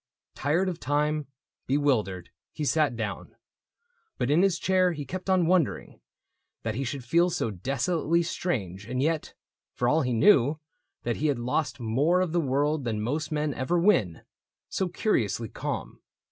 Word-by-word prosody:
Tired 160 Hz, +7 st, +1 dB
of 175 Hz, -2 st, -3 dB
time, 150 Hz, +1 st, 0 dB, 0.4 s
bewildered, 120 Hz, -11 st, 0 dB, 0.2 s
he 150 Hz, -, -4 dB
sat 150 Hz, -3 st, +2 dB
down; 110 Hz, -3 st, -5 dB, 0.8 s
But 125 Hz, -, 0 dB
in 160 Hz, +4 st, +4 dB
his 190 Hz, -3 st, +3 dB
chair 185 Hz, -1 st, +2 dB
he 150 Hz, -3 st, -6 dB
kept 185 Hz, +7 st, -6 dB
on 185 Hz, -2 st, +4 dB
wondering 165 Hz, -, 0 dB, 0.6 s
That 110 Hz, -, -1 dB
he 130 Hz, +5 st, -2 dB
should 135 Hz, +1 st, -4 dB
feel 170 Hz, +8 st, +3 dB
so 115 Hz, -9 st, -1 dB
desolately 155 Hz, -, 0 dB
strange 105 Hz, -, -3 dB
And 125 Hz, +1 st, -2 dB
yet 155 Hz, +2 st, -1 dB, 0.2 s
— -, -, -66 dB
for 120 Hz, -, 0 dB
all 155 Hz, +5 st, +3 dB
he 125 Hz, -2 st, 0 dB
knew 145 Hz, -, +4 dB, 0.4 s
that 120 Hz, -1 st, -1 dB
he 155 Hz, -, 0 dB
had 145 Hz, -4 st, +1 dB
lost 125 Hz, +1 st, -1 dB
More 135 Hz, +10 st, +2 dB
of 185 Hz, -3 st, 0 dB
the 170 Hz, +1 st, +2 dB
world 145 Hz, +1 st, 0 dB
than 110 Hz, -3 st, -2 dB
most 145 Hz, +9 st, -2 dB
men 150 Hz, -1 st, 0 dB
ever 130 Hz, +8 st, 0 dB
win 170 Hz, -, +2 dB, 0.2 s
— -, -, -66 dB
So 190 Hz, -, -1 dB
curiously 120 Hz, -, 0 dB
calm. -, -, -5 dB
145 Hz, 170 wpm, -27 LUFS, 120-170 Hz, 0.8 s, in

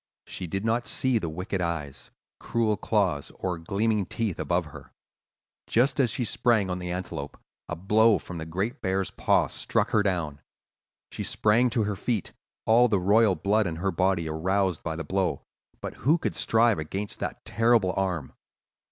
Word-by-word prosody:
She 90 Hz, -, -6 dB
did 95 Hz, +5 st, -3 dB
not 115 Hz, +2 st, 0 dB
see 130 Hz, -3 st, +1 dB
the 85 Hz, -, -3 dB
wicked 90 Hz, +4 st, -3 dB
eyes, 75 Hz, -6 st, -4 dB, 0.3 s
cruel 115 Hz, -2 st, 0 dB
claws, 100 Hz, -8 st, 0 dB
or 90 Hz, -3 st, -3 dB
gleaming 100 Hz, +4 st, 0 dB
teeth 110 Hz, -6 st, -2 dB
above -, -, 0 dB
her. -, -, -12 dB, 0.7 s
Just 125 Hz, +4 st, +2 dB
as 130 Hz, -4 st, +4 dB
she 120 Hz, +3 st, -2 dB
sprang 110 Hz, -4 st, +2 dB
on 90 Hz, -, -2 dB
the 90 Hz, 0 st, -5 dB
antelope, 90 Hz, -5 st, -5 dB, 0.3 s
a 85 Hz, -, -2 dB
blow 105 Hz, +5 st, +4 dB
from 90 Hz, -2 st, -8 dB
the 80 Hz, -, -6 dB
great 95 Hz, +8 st, -3 dB
bear's 95 Hz, 0 st, -1 dB
paw -, -, +2 dB
struck -, -, -1 dB
her 110 Hz, -, +4 dB
down. 85 Hz, -8 st, -2 dB, 0.7 s
She -, -, -4 dB
sprang 115 Hz, +4 st, +3 dB
to 115 Hz, -1 st, +1 dB
her 105 Hz, 0 st, -2 dB
feet, 105 Hz, 0 st, -2 dB, 0.3 s
all 120 Hz, +2 st, +5 dB
the 105 Hz, -4 st, +2 dB
royal 100 Hz, +2 st, +4 dB
blood 100 Hz, +5 st, +1 dB
in 80 Hz, -, -3 dB
her 95 Hz, +4 st, -1 dB
body 90 Hz, -1 st, +1 dB
aroused 90 Hz, +2 st, 0 dB
by 80 Hz, -1 st, -3 dB
the 85 Hz, -, -4 dB
blow; 95 Hz, +4 st, -1 dB, 0.4 s
but -, -, -5 dB
who 150 Hz, +6 st, +3 dB
could 170 Hz, -, -3 dB
strive 115 Hz, -3 st, +3 dB
against 95 Hz, +7 st, -4 dB
that -, -, -5 dB
terrible 115 Hz, -5 st, +3 dB
arm? 90 Hz, -8 st, -2 dB
95 Hz, 175 wpm, -27 LUFS, 85-110 Hz, 0.7 s, all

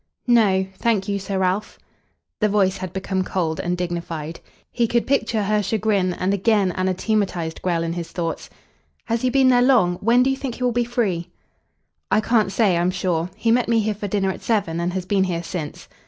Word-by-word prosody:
"No, 210 Hz, -6 st, +4 dB
thank 220 Hz, -4 st, +1 dB
you, 200 Hz, -1 st, -1 dB
Sir 195 Hz, 0 st, -3 dB
Ralph." 190 Hz, +2 st, -1 dB, 0.6 s
The 215 Hz, -, +2 dB
voice 195 Hz, -2 st, +2 dB
had 185 Hz, -2 st, -6 dB
become 190 Hz, 0 st, -2 dB
cold 165 Hz, -4 st, -2 dB
and 180 Hz, 0 st, -1 dB
dignified. 170 Hz, -2 st, -4 dB, 0.3 s
He 235 Hz, -1 st, +1 dB
could 235 Hz, +1 st, +1 dB
picture 230 Hz, -5 st, +1 dB
her 210 Hz, +1 st, +1 dB
chagrin, 200 Hz, -3 st, 0 dB
and 185 Hz, +2 st, 0 dB
again 200 Hz, -1 st, +2 dB
anathematised 185 Hz, -2 st, -1 dB
Grell 170 Hz, -2 st, 0 dB
in 165 Hz, 0 st, -2 dB
his 170 Hz, -1 st, -5 dB
thoughts. 165 Hz, -2 st, -4 dB, 0.6 s
"Has 230 Hz, -1 st, -1 dB
he 255 Hz, -, +2 dB
been 265 Hz, 0 st, +4 dB
there 245 Hz, -1 st, +5 dB
long? 230 Hz, -9 st, +4 dB
When 235 Hz, +5 st, +3 dB
do 265 Hz, -, +2 dB
you 270 Hz, -, -2 dB
think 265 Hz, -4 st, -4 dB
he 255 Hz, -, -5 dB
will 250 Hz, -, +2 dB
be 240 Hz, 0 st, 0 dB
free?" 195 Hz, -8 st, -1 dB, 0.8 s
"I -, -, +3 dB
can't 215 Hz, -2 st, +2 dB
say, 200 Hz, -5 st, +2 dB
I'm 175 Hz, +1 st, +2 dB
sure. 180 Hz, -2 st, -1 dB
He 230 Hz, -, +1 dB
met 245 Hz, +1 st, +2 dB
me 230 Hz, -1 st, +3 dB
here 215 Hz, 0 st, 0 dB
for 205 Hz, 0 st, -5 dB
dinner 195 Hz, -1 st, 0 dB
at -, -, -8 dB
seven 200 Hz, -8 st, 0 dB
and 170 Hz, +1 st, -1 dB
has 185 Hz, -1 st, -3 dB
been 190 Hz, 0 st, +2 dB
here 170 Hz, -2 st, -2 dB
since." 165 Hz, -4 st, -6 dB
195 Hz, 205 wpm, -22 LUFS, 180-225 Hz, 0.8 s, there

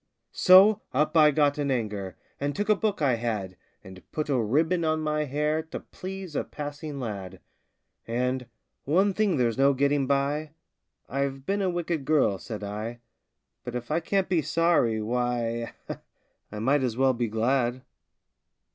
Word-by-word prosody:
So 195 Hz, +3 st, +7 dB
up 150 Hz, +3 st, +1 dB
I 155 Hz, -2 st, +7 dB
got 145 Hz, 0 st, +2 dB
in 145 Hz, -1 st, 0 dB
anger, 105 Hz, -7 st, -3 dB, 0.2 s
And 145 Hz, 0 st, -2 dB
took 205 Hz, +1 st, -2 dB
a 215 Hz, -, +6 dB
book 205 Hz, -5 st, -1 dB
I 130 Hz, -4 st, +3 dB
had, 105 Hz, -6 st, -3 dB, 0.3 s
And 95 Hz, 0 st, -12 dB
put 155 Hz, -1 st, -3 dB
a 130 Hz, -4 st, +2 dB
ribbon 160 Hz, -, +1 dB
on 155 Hz, 0 st, +1 dB
my 150 Hz, 0 st, 0 dB
hair 150 Hz, +3 st, 0 dB
To 160 Hz, -, -7 dB
please 190 Hz, -3 st, -8 dB
a -, -, 0 dB
passing 145 Hz, 0 st, -6 dB
lad, 100 Hz, -6 st, -6 dB, 0.7 s
And, 125 Hz, +2 st, -1 dB, 0.4 s
"One 190 Hz, +7 st, +3 dB
thing 200 Hz, -5 st, +1 dB
there's 120 Hz, -1 st, 0 dB
no 140 Hz, 0 st, +4 dB
getting 140 Hz, 0 st, +1 dB
by 145 Hz, +2 st, 0 dB, 0.5 s
I've 135 Hz, 0 st, -3 dB
been 200 Hz, +1 st, 0 dB
a 190 Hz, -, +1 dB
wicked 170 Hz, -3 st, -2 dB
girl," 135 Hz, -11 st, +2 dB
said 110 Hz, 0 st, -7 dB
I; 105 Hz, +4 st, -5 dB, 0.6 s
"But 125 Hz, -, -6 dB
if 120 Hz, +3 st, -5 dB
I 160 Hz, -, +2 dB
can't 195 Hz, +3 st, 0 dB
be 175 Hz, -3 st, +2 dB
sorry, 150 Hz, -10 st, +2 dB
why, 120 Hz, 0 st, -1 dB, 0.8 s
I 105 Hz, -, -7 dB
might 135 Hz, +6 st, +2 dB
as 125 Hz, -3 st, -1 dB
well 130 Hz, 0 st, +3 dB
be 120 Hz, -1 st, -1 dB
glad!" 120 Hz, +3 st, 0 dB
140 Hz, 165 wpm, -27 LUFS, 120-155 Hz, 0.8 s, So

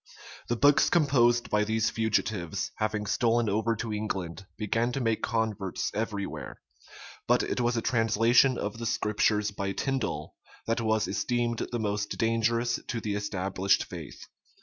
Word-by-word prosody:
The 120 Hz, -, 0 dB
books 145 Hz, +4 st, +5 dB
composed 125 Hz, -7 st, +3 dB
by 105 Hz, 0 st, +3 dB
these 110 Hz, +1 st, 0 dB
fugitives, 110 Hz, -6 st, -1 dB
having 110 Hz, -1 st, -1 dB
stolen 115 Hz, +2 st, +2 dB
over 110 Hz, +3 st, +1 dB
to 110 Hz, 0 st, -4 dB
England, 95 Hz, -3 st, -4 dB
began 115 Hz, +3 st, 0 dB
to 135 Hz, -, -1 dB
make 115 Hz, -3 st, 0 dB
converts 110 Hz, -5 st, -1 dB
every 105 Hz, -2 st, -2 dB
where; -, -, -8 dB, 0.7 s
but -, -, +3 dB
it -, -, -1 dB
was 120 Hz, 0 st, +1 dB
a 115 Hz, -, -1 dB
translation 120 Hz, +2 st, +3 dB
of 105 Hz, +2 st, -4 dB
the 115 Hz, -, -3 dB
Scriptures 105 Hz, -2 st, +1 dB
by 100 Hz, -1 st, -3 dB
Tindal 110 Hz, -, -2 dB, 0.3 s
that 115 Hz, +1 st, 0 dB
was 110 Hz, -1 st, +1 dB
esteemed 120 Hz, +3 st, -1 dB
the 120 Hz, -, -1 dB
most 105 Hz, -2 st, -2 dB
dangerous 115 Hz, +1 st, +1 dB
to 120 Hz, -, -2 dB
the 105 Hz, -2 st, -3 dB
established 95 Hz, -1 st, 0 dB
faith. 85 Hz, -5 st, -9 dB
110 Hz, 150 wpm, -28 LUFS, 105-120 Hz, 0.7 s, books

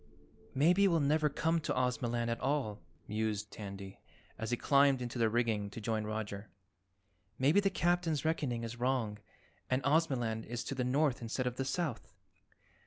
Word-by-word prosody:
"Maybe 180 Hz, +8 st, +5 dB
we'll 170 Hz, -3 st, +3 dB
never 150 Hz, +1 st, +2 dB
come 160 Hz, +3 st, +1 dB
to 155 Hz, -, -2 dB
Ozamaland 120 Hz, -2 st, 0 dB
at 115 Hz, -, -2 dB
all," 130 Hz, -8 st, -1 dB, 0.3 s
mused 105 Hz, -1 st, -2 dB
Tandy 100 Hz, -2 st, -8 dB, 0.4 s
as 115 Hz, +1 st, -4 dB
he 120 Hz, -, 0 dB
climbed 140 Hz, 0 st, +4 dB
into 120 Hz, 0 st, -4 dB
the 115 Hz, -1 st, +3 dB
rigging 110 Hz, -3 st, 0 dB
to 100 Hz, -, -8 dB
join 110 Hz, 0 st, -1 dB
Roger. 105 Hz, -1 st, -4 dB, 0.9 s
"Maybe 145 Hz, +9 st, +4 dB
the 200 Hz, -1 st, +2 dB
Captain's 175 Hz, -5 st, +1 dB
reckoning 140 Hz, -7 st, 0 dB
is 115 Hz, +1 st, -6 dB
wrong 120 Hz, -5 st, 0 dB, 0.5 s
and 130 Hz, +1 st, +1 dB
Ozamaland 130 Hz, -7 st, +1 dB
is 120 Hz, +1 st, -3 dB
to -, -, -4 dB
the 130 Hz, -2 st, -1 dB
north 135 Hz, +1 st, +1 dB
instead 120 Hz, +2 st, -2 dB
of 125 Hz, 0 st, -2 dB
the 135 Hz, -, -1 dB
south." 140 Hz, -4 st, -3 dB
125 Hz, 165 wpm, -33 LUFS, 110-145 Hz, 0.9 s, Maybe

